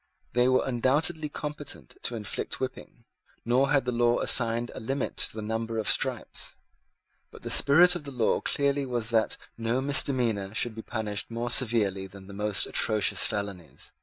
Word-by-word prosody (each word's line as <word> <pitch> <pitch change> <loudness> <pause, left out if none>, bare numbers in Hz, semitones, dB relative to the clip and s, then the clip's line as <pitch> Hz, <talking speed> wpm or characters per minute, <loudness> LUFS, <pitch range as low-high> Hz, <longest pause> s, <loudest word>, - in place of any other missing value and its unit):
They 125 +1 +3
were 130 0 +3
undoubtedly 145 +5 +1
competent 150 0 -6
to 120 - -2
inflict 105 -2 -5
whipping; 130 -2 -6 0.4
nor 130 +4 +3
had 135 -2 +2
the 125 - 0
law 120 0 +2
assigned 115 0 +2
a - - -7
limit 135 +4 -3
to - - -1
the 110 - -5
number 115 +1 -3
of 110 - -2
stripes. - - -1 0.7
But - - -15
the - - -4
spirit 175 +6 +6
of 175 -4 -4
the 140 - -6
law 120 -4 +1
clearly 140 -1 0
was 120 -2 -2
that 110 -1 +1 0.2
no 115 +2 0
misdemeanour 125 -7 +1
should 120 -1 +1
be 110 - -7
punished 110 -3 -4
more 120 +1 -3
severely 105 -7 +2
than 95 0 -13
the 100 - -11
most 105 0 0
atrocious 110 -2 +2
felonies. 100 -6 -6
120 Hz, 170 wpm, -27 LUFS, 110-135 Hz, 0.7 s, spirit